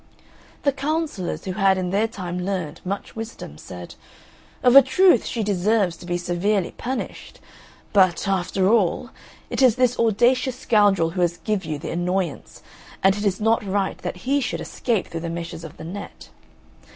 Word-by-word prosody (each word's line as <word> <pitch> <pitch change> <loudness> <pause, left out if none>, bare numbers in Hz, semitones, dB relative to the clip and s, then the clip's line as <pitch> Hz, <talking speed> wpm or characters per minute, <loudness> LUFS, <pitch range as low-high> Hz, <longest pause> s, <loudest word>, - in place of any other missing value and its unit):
The 280 - +3
Councillors, 285 - -3
who 190 - -2
had 195 0 +3
in 180 -1 -2
their 210 +3 +2
time 180 -4 -5
learned 180 -5 -3
much 195 +2 -5
wisdom, 225 - -8
said, 90 -1 -9 0.7
"Of 250 +1 +5
a 275 - +12
truth 270 - +4
she 230 - -2
deserves 200 -1 +1
to 175 - -12
be 175 0 0
severely 180 +2 0
punished. 260 +2 -5 0.5
But, 185 -3 +3
after 190 0 +1
all, 225 +3 +2 0.4
it - - -1
is 250 -4 +6
this 250 -1 +1
audacious 240 +3 +2
scoundrel 200 -9 +3
who 180 +1 -2
has 175 0 +1
give 190 +2 -2
you 155 -1 -3
the 145 - -6
annoyance, 175 -2 -3 0.4
and 195 0 +5
it 205 - -4
is 195 -2 +1
not 225 +1 +2
right 195 -1 -1
that 180 - -6
he 280 +2 +2
should 235 - -2
escape 225 -6 -1
through 165 - -4
the 170 0 -4
meshes 170 0 -6
of 160 - -10
the - - -9
net. 190 +5 -8
195 Hz, 175 wpm, -23 LUFS, 175-230 Hz, 0.7 s, a